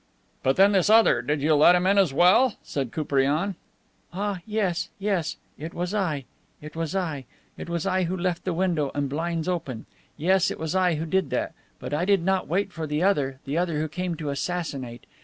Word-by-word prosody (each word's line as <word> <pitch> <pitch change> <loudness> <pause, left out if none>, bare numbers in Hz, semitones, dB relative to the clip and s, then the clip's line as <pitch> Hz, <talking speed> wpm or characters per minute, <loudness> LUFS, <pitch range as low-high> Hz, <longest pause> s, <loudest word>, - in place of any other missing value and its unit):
"But 135 +1 +2
then, 195 +2 +6
this 195 -1 +2
other, 220 - +5
did 145 +3 -2
you 155 +1 +4
let 155 +4 +6
him 180 0 +1
in 200 +1 +4
as 185 -7 +3
well?" 180 - +4
said 135 -5 -3
Koupriane. 150 - 0 0.6
"Ah, 200 +1 -3
yes, 190 -5 -1
yes. 195 -5 -1 0.2
It 160 +3 -7
was 180 +2 -3
I. 160 -10 -1 0.3
It 150 +1 -11
was 165 +2 -3
I. 160 -8 -2 0.3
It - - -8
was 170 0 -2
I 185 -1 +1
who 185 +2 -2
left 175 -1 -2
the 185 - -1
window 170 -6 0
and 145 -1 0
blinds 165 +3 -2
open. 160 -11 -3 0.3
Yes, 185 +4 +3
it - - -6
is 160 0 -3
I 185 -3 +2
who 155 +2 -3
did 190 +4 0
that. - - -2 0.3
But - - -6
I 160 +4 0
did 195 -3 +3
not 190 +1 +1
wait 195 +3 -1
for 160 -1 -4
the 150 +3 -1
other, 140 -9 +1
the 145 +4 -1
other 170 -4 -1
who 155 - -1
came 180 +2 -3
to 155 -3 -4
assassinate. 140 -6 -4
170 Hz, 210 wpm, -25 LUFS, 150-190 Hz, 0.6 s, then